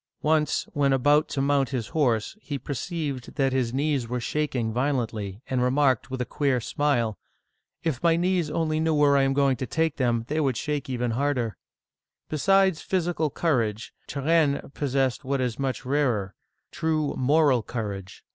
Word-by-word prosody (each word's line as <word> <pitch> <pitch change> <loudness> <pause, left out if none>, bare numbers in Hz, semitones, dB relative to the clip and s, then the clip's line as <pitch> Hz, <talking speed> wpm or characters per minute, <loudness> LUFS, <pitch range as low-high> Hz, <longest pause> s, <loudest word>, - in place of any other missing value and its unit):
Once, 155 0 +2
when 140 -3 +2
about 145 +4 +3
to 135 - -2
mount 140 -2 +2
his 125 -5 -3
horse, 120 -9 0
he 145 -7 -4
perceived 140 0 -4
that 135 -2 +1
his 125 -3 0
knees 140 -2 0
were 125 +1 -2
shaking 125 -4 -1
violently, 115 -5 -2
and 130 -1 0
remarked 130 -1 +2
with 130 0 -4
a 125 - -1
queer 140 -2 0
smile, 120 -4 0 0.6
If 150 -6 -1
my 170 -1 +4
knees 175 -2 +1
only 155 0 0
knew 160 0 +1
where 145 -1 +4
I 140 - +4
am 135 0 +2
going 135 -2 +2
to 130 - -4
take 160 +1 0
them, 120 -4 +1
they 155 +2 -1
would 135 -6 +1
shake 150 -3 -3
even 125 -2 -1
harder! 125 -3 -1 0.7
Besides 190 +2 +3
physical 175 -4 0
courage, 115 -9 -1
Turenne 145 -1 +1
possessed 135 -2 0
what 135 +1 -1
is 125 -2 -2
much 135 -1 -2
rarer, 125 -9 0 0.4
true 160 -3 0
moral 140 -1 +3
courage. 100 -5 -6
140 Hz, 165 wpm, -26 LUFS, 125-150 Hz, 0.7 s, my